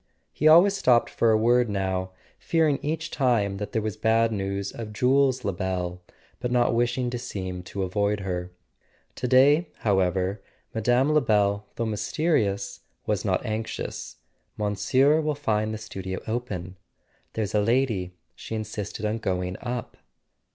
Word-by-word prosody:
He 155 - +2
always 175 +6 +7
stopped 125 -11 +3
for 115 - +2
a 110 - +5
word 120 +1 +3
now; 95 -2 -1 0.3
fearing 160 -4 +2
each 160 +2 -3
time 115 -8 +1
that 105 +1 -5
there 110 -3 -1
was 110 -2 -3
bad 115 +1 +2
news 100 -1 -2
of 110 -2 -7
Jules 130 +3 +2
Lebel, 90 -2 -2 0.4
but 125 - -3
not 120 0 +3
wishing 120 +1 0
to 120 - -3
seem 95 -6 -5
to 100 0 -4
avoid 100 +2 0
her. 90 -1 -4 0.6
To 125 - -3
day, 145 +7 +5
however, 95 -1 +1 0.3
Mme. 120 +6 +2
Lebel, 105 -8 +2
though 115 - -1
mysterious, 105 - 0 0.3
was - - -1
not - - 0
anxious. 110 +1 -4 0.4
"Monsieur 130 - +2
will 150 -1 -1
find 110 -6 0
the 110 - -3
studio 95 -3 -6
open. 100 -6 -4 0.6
There's 110 -3 -2
a 105 - +3
lady: 110 -6 0 0.2
she 115 - -7
insisted 110 -1 -5
on 110 +2 -1
going 90 -3 -2
up." 120 -1 -5
110 Hz, 145 wpm, -26 LUFS, 100-125 Hz, 0.6 s, always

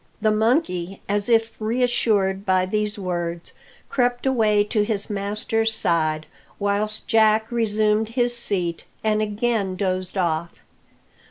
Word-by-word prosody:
The 215 - +2
monkey, 215 - 0
as 205 +2 +2
if 225 -1 +3
reassured 215 -4 +1
by 185 -2 +2
these 210 +2 -1
words, 175 -3 -4 0.3
crept 245 -1 0
away 215 -6 +3
to 210 +1 0
his 210 -1 -1
master's 210 +2 -1
side, 155 -5 0 0.3
whilst 205 +1 -1
Jack 220 0 +3
resumed 215 -1 +1
his 240 0 0
seat, 180 -8 -2 0.2
and 215 -1 +1
again 210 -2 -1
dozed 185 -1 -2
off. 170 -2 -2
210 Hz, 120 wpm, -23 LUFS, 190-225 Hz, 0.3 s, if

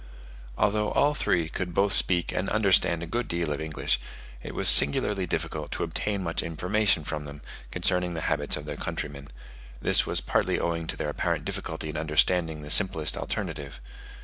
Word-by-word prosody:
Although 105 0 0
all 145 +1 +2
three 85 - -1
could 90 +2 -5
both 100 0 +1
speak 85 -2 +3
and 90 - -3
understand 95 -5 +2
a - - -4
good 120 +8 -4
deal 85 -3 -2
of 75 - -6
English, 80 -1 -2 0.4
it - - -9
was - - +4
singularly 95 +7 +7
difficult 80 -2 -4
to - - -3
obtain 100 -2 -3
much 85 -1 -2
information 90 +2 -1
from 75 0 -6
them, 70 0 -11 0.3
concerning 90 +2 -1
the 80 - -4
habits 75 -1 -1
of - - -9
their - - -7
countrymen; 70 -1 -6 0.5
this - - +4
was - - +1
partly - - -1
owing 85 -1 -3
to - - -4
their 75 - -3
apparent 75 - -3
difficulty 80 -1 -6
in 75 - -6
understanding 80 +1 0
the 75 - -3
simplest 80 -6 +3
alternative. 75 -10 -6
85 Hz, 175 wpm, -26 LUFS, 75-95 Hz, 0.5 s, singularly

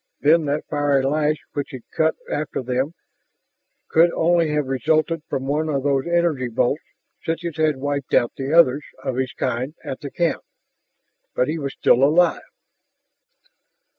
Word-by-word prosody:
Then 155 +2 +4
that 145 +1 -1
fiery 145 -2 +1
lash 150 +2 +1 0.2
which 145 -1 -3
had 130 -3 -8
cut 160 0 +1
after 145 -3 -3
them 130 +6 -1 0.9
could 165 +2 +5
only 170 -1 +2
have 150 -1 0
resulted 155 +5 0
from 130 - -2
one 150 +3 0
of 140 -3 -1
those 140 +1 +1
energy 170 -7 +1
bolts 120 +5 0 0.4
such 165 +1 -3
as 165 -2 -4
had 155 -3 +2
wiped 140 0 -2
out 120 - +3
the 135 +1 -4
others 150 -4 +5 0.2
of 130 - -2
his 130 -1 -1
kind 130 +4 -2
at 130 - -5
the 140 - -6
camp. 170 +2 -1 0.9
But 125 - +1
he 160 +1 -2
was 140 -2 -4
still 125 - +4
alive 165 +4 +4
145 Hz, 160 wpm, -22 LUFS, 135-160 Hz, 0.9 s, could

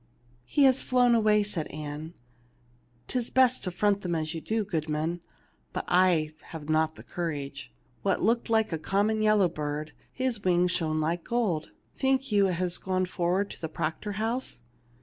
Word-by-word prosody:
"He 285 - +2
has 265 -1 +5
flown 250 -1 +3
away,'' 215 -2 +4
said 180 -6 -3
Ann. 150 +2 -7 0.9
"'Tis 245 -2 -1
best 255 -1 +3
to - - 0
front 200 +2 +1
them 175 -2 -2
as 155 0 -2
you 165 - -5
do, 220 +3 -1
goodman, 160 -1 -2 0.5
but - - -3
I 175 -4 +3
have 155 -3 -8
not 155 0 +2
the - - -12
courage. 145 - -5 0.3
That - - +2
looked 230 +4 +1
like 220 -2 +2
a 160 - -1
common 205 +6 +1
yellow 215 -3 +4
bird; 150 -1 -4 0.2
his 255 -5 -2
wings 180 -1 +3
shone 155 -3 0
like 165 +2 -1
gold. 210 -10 -1 0.3
Think 265 -1 +1
you 200 -2 +4
it 185 - 0
has 180 0 0
gone 185 -1 0
forward 180 +2 0
to - - -11
the 160 - -3
Proctor 160 +7 -3
house 225 - -2
180 Hz, 170 wpm, -28 LUFS, 160-215 Hz, 0.9 s, has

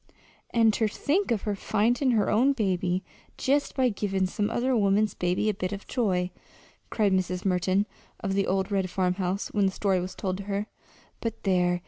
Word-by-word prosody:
"An' 225 -2 +4
ter 220 +1 +1
think 305 - 0
of 225 -4 0
her 210 -1 -1
findin' 240 +7 +1
her 210 - +2
own 255 +6 +4
baby 185 -5 0 0.3
jest 285 +2 +1
by 260 -2 +3
givin' 195 -3 -1
some 205 +3 -1
other 250 +3 +1
woman's 210 0 +2
baby 180 +4 0
a 215 - +2
bit 185 -2 -3
of 200 0 -6
joy!" 185 -7 0 0.6
cried 205 -3 +2
Mrs. 185 0 -1
Merton 185 +2 +2 0.3
of 195 -4 -2
the 195 0 +1
old 190 +2 0
red 190 -2 0
farmhouse, 185 +1 -1
when 205 -2 +2
the - - 0
story 190 -1 +1
was 180 +1 -5
told 185 -2 -2
to 200 - -7
her. 200 +1 -2 0.5
"But, 225 -1 -4
there! 180 -2 +2
200 Hz, 185 wpm, -27 LUFS, 185-220 Hz, 0.6 s, An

